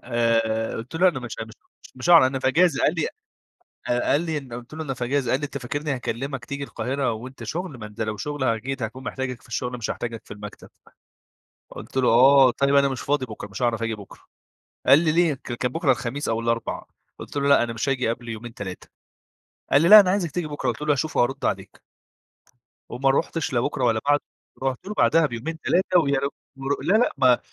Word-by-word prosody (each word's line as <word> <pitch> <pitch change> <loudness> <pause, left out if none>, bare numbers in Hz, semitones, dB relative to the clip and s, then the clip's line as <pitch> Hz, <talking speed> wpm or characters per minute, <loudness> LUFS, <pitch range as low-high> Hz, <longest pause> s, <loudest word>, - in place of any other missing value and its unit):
آآ، 115 -2 0
قلت 115 +6 -8
له 185 +3 +5
أنا 150 -7 -2
مش 120 -1 -7
مش 115 - -13 0.3
مش - - -25
مش 130 +7 -2
هاعرف، 165 -7 +8
أنا 135 +1 -2
في 130 - +1
أجازة. 160 -1 +3
قال 155 - +3
لي 165 -3 0 0.9
قال 145 - +2
لي 160 -2 -2
أن 135 -4 -11
قلت 120 +4 -8
له: 160 - -5
"أنا 135 -3 -3
في 125 -1 -4
أجازة."، 130 -1 0
قال 130 - +1
لي: - - -3
"أنت 140 - -6
فاكرني 145 +3 -3
هاكلمك 130 +1 -4
تيجي 140 0 -5
القاهرة 130 +1 -2
وأنت 120 +2 -8
شغل؟ 155 +2 -5
ما 110 - -7
أنت 105 +2 -13
لو 110 -1 -2
شغل 145 +4 -3
أكيد 125 +3 -1
هاكون 115 +4 -5
محتاجك 130 -2 -4
في - - -20
الشغل، 125 +2 -3
مش 115 - -3
هاحتاجك 115 -1 -5
في - - -9
المكتب." 105 0 -10 1.0
قلت - - -11
له: 130 -2 +3
"آه، 130 +3 +7
طيب 140 +3 +1
أنا 140 0 +5
مش 130 -2 -4
فاضي 140 -2 0
بُكرة، 110 -3 -8
مش 100 +4 -7
هاعرف 115 -2 +1
أجي 115 -1 -1
بُكرة." 100 -3 -13 0.7
قال 140 - +8
لي: 160 -1 +2
"ليه؟"، 170 -2 +3
ك 130 -2 -9
كان 125 +1 -2
بُكرة 165 -2 +1
الخميس 130 +4 -4
أو 115 0 0
الأربع، 115 0 -2 0.3
قلت - - -10
له: 140 0 +1
"لأ 140 - +6
أنا 120 -1 -2
مش 115 +5 -3
هاجي 130 -3 0
قبل 115 +1 -4
يومين، 115 +1 -7
3"، 95 -3 -7 0.8
قال 140 - +5
لي: 170 - +3
"لأ، 215 +1 +12
أنا 195 -3 +4
عايزك 185 -6 -1
تيجي 175 -1 -3
بُكرة." 145 -1 -2
قلت - - -4
له: 150 - +1
"هاشوف 145 +2 -2
وهارُد 135 +3 +1
عليك." - - -3 1.1
وما 135 +2 +1
رحتش 160 +2 -1
لا 120 - +2
بُكرة 135 +1 -1
ولا 115 -2 +2
بعده، 145 0 +3 0.4
رحت 130 +2 -2
له 210 - -4
بعدها 165 -5 +4
بيومين، 145 +6 -5
3 185 +2 +2
ويعن 140 -2 0 0.5
لا، 190 - +2
لأ، 245 - +2
ما 125 -2 +5
130 Hz, 220 wpm, -24 LUFS, 115-145 Hz, 1.1 s, لأ